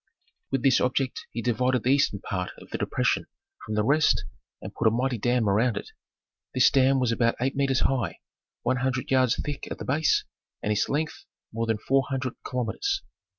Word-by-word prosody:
With 135 -3 -1
this 135 -2 +4
object 130 +1 -1
he 115 - -5
divided 125 0 +1
the 130 - +3
eastern 140 -8 +2
part 90 -3 -3
of - - -15
the - - -3
depression - - 0 0.4
from 110 - -4
the 105 - +2
rest 150 +6 +3 0.3
and - - -8
put 115 - +1
a - - +8
mighty 120 +1 0
dam 120 0 +1
around 105 +3 +2
it. - - -6 0.6
This 130 - +5
dam 135 0 +4
was 125 -2 +1
about 115 0 +2
eight 130 +2 0
metres 135 -2 +1
high, 130 -6 0 0.5
one 130 - +1
hundred 130 0 -2
yards 130 -2 +4
thick 145 -1 -4
at - - -5
the - - -7
base, 150 +4 +2 0.4
and 105 - 0
its 105 - +1
length 150 +2 -2 0.3
more 115 +1 -2
than 110 -1 +1
four 135 +5 +1
hundred 130 -2 -2
kilometres. 390 - -2
125 Hz, 195 wpm, -26 LUFS, 115-135 Hz, 0.6 s, a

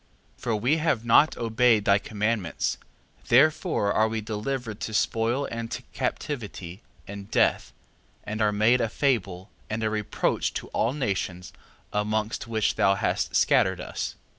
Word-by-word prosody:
3:4. - - -24
For 115 - 0
we 125 +9 +1
have 155 -8 0
not 140 +6 +5
obeyed 115 -2 +2
thy 100 +1 +4
commandments, 105 -4 -2 0.5
therefore 145 - +3
are 110 - +3
we 110 0 -2
delivered 110 +1 -4
to 110 - -4
spoil 115 +6 +1
and 115 0 -4
to - - -5
captivity, 100 - -4 0.3
and 100 0 -8
death, - - +2 0.5
and 110 +1 -4
are 105 -1 +3
made 110 +4 +3
a 115 - 0
fable, 100 -8 -1 0.2
and 110 +1 -2
a 110 - 0
reproach 105 -1 -1
to - - -5
all 115 +4 0
nations, 95 -9 -3 0.4
amongst 105 +1 -1
which 110 -2 0
thou 100 0 +4
hast - - -1
scattered - - +3
us. - - -5
110 Hz, 150 wpm, -26 LUFS, 105-120 Hz, 0.5 s, not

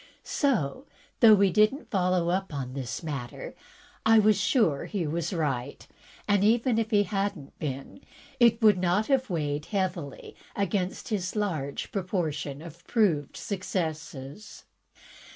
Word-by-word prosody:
So, 260 - 0 0.3
though 225 -4 +8
we 200 -1 +3
did 215 +4 +5
n't 290 - -13
follow 180 -3 +1
up 190 +1 -1 0.2
this 135 +3 -5
matter, 140 -7 -6 0.5
I 225 0 +6
was 215 0 +5
siire 190 - +2
he 195 -5 -2
was 165 +4 -2
right, 140 -7 -3 0.4
and, 205 -1 +3
even 230 +2 +3
if 225 -1 -1
he 205 -2 +4
had 200 0 -1
n't 140 -2 -14
been, 140 - -5 0.4
it 235 -1 +4
would 210 -4 +6
not 180 +4 +2
have 265 -1 +1
weighed 150 -3 -2
heavily 185 -8 -3 0.2
against 195 +3 -2
his 190 -4 -2
large 160 -10 -2
proportion 160 -7 -3
of 170 0 -12
proved 175 - +1
successes. 160 -3 -5
185 Hz, 135 wpm, -27 LUFS, 155-215 Hz, 0.5 s, though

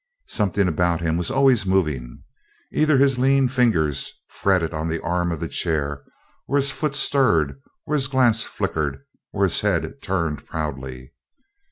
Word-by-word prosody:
Something 100 -2 +1
about 85 0 +1
him 80 -1 0
was 85 0 -1
always 135 -5 +4
moving. 75 -11 -1 0.5
Either 155 -2 +3
his 135 -1 +3
lean 135 +1 +4
fingers 110 - +1 0.2
fretted 90 -4 0
on 80 +1 -2
the 85 0 -2
arm 85 +1 0
of 85 - -3
the - - -3
chair, 75 -3 -1 0.5
or 140 - -1
his 140 -1 +2
foot 150 0 -2
stirred, 80 - +2 0.2
or 150 - -3
his 140 -3 +1
glance 120 -5 +3
flickered, 75 -8 -3 0.3
or - - -1
his - - +2
head - - -1
turned 85 -6 -2
proudly. 65 -3 -5
90 Hz, 155 wpm, -22 LUFS, 75-130 Hz, 0.5 s, always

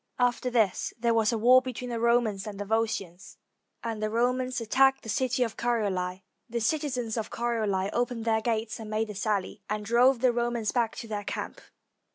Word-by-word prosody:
After 245 0 +1
this 220 -6 +1
there 235 0 +1
was 225 -1 +3
a 230 - 0
war 250 +4 +6
between 250 -1 -5
the 230 - -2
Romans 230 -4 +1
and 205 -2 -7
the 205 - -3
Volscians; 205 -5 -2 0.5
and 225 -2 -3
the 215 - 0
Romans 250 +3 0
attacked 270 +4 +3
the 225 - -8
city 255 +3 +1
of 225 -2 -4
Corioli. 190 -6 -1 0.3
The 235 +1 -2
citizens 250 -2 -1
of 220 -1 -3
Corioli 220 -5 -1
opened 240 -1 -1
their 220 -1 +2
gates 225 0 -2
and 220 -1 -7
made 215 0 -1
a - - -7
sally, 205 0 -2
and 210 0 -2
drove 245 +4 +4
the 255 -2 +4
Romans 235 -2 -1
back 235 -3 0
to 230 - -7
their 210 -2 -4
camp. - - -5
230 Hz, 195 wpm, -28 LUFS, 215-245 Hz, 0.5 s, war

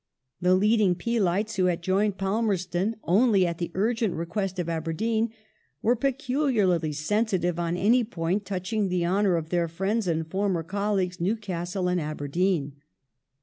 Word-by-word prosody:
The 180 +1 +4
leading 205 -1 +3
Peelites, 210 +1 0
who 185 - +3
had 175 -1 0
joined 195 +2 +1
Palmerston 195 -1 0
only 200 0 +4
at 170 -1 -3
the 170 - -2
urgent 220 +1 0
request 185 +3 -3
of 175 -2 -2
Aberdeen, 215 +8 -1 0.5
were 240 +3 +4
peculiarly 250 - +1
sensitive 180 +2 0
on 170 0 -1
any 235 +7 +4
point 185 -1 -2
touching 195 +1 -2
the 180 -1 0
honour 190 +1 +2
of 160 -1 -3
their 175 -1 +1
friends 195 +6 -1
and 160 -1 0
former 190 -1 -1
colleagues, 190 -1 -1
Newcastle 185 -2 -2
and 180 -1 +1
Aberdeen. 150 0 -1
185 Hz, 145 wpm, -26 LUFS, 175-210 Hz, 0.5 s, The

